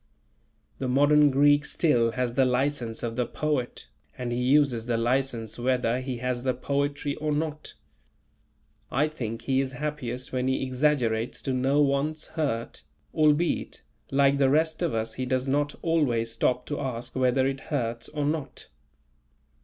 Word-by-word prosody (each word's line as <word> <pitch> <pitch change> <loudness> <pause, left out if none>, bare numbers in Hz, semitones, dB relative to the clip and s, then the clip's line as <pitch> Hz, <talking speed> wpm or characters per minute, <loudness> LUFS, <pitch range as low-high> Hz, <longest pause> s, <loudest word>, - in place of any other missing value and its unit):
The 130 - -2
modern 145 +3 +5
Greek 145 +1 +4
still 120 -9 +1
has 125 -2 -1
the 135 - +3
license 125 -2 -1
of 115 -1 -3
the 125 -1 0
poet, 145 - -2 0.3
and 125 -1 -3
he 120 +1 -1
uses 130 -3 +3
the 120 -1 +1
license 120 -2 -1
whether 125 -1 +1
he 130 -1 -4
has 125 0 -2
the 130 0 0
poetry 140 +2 -1
or 155 0 -2
not. 150 0 -3 1.1
I 150 +3 +2
think 115 -7 -5
he 135 +1 +2
is 135 -1 -4
happiest 130 -3 -4
when 130 0 0
he 130 0 0
exaggerates 125 -4 0
to 135 - -1
no 135 +3 +2
one's 145 +3 -1
hurt; 140 -8 -3 0.3
albeit, 155 +2 +1 0.3
like 140 0 +3
the 135 -1 +4
rest 160 +4 +1
of 170 -8 0
us 110 0 -2
he 130 - -3
does 130 +1 0
not 145 +2 0
always 130 -9 +1
stop 125 +2 0
to 145 - -4
ask 125 -1 -4
whether 130 0 +2
it 135 0 -1
hurts 120 -5 -2
or 150 -1 -2
not. 145 -3 -3
130 Hz, 160 wpm, -27 LUFS, 125-145 Hz, 1.1 s, modern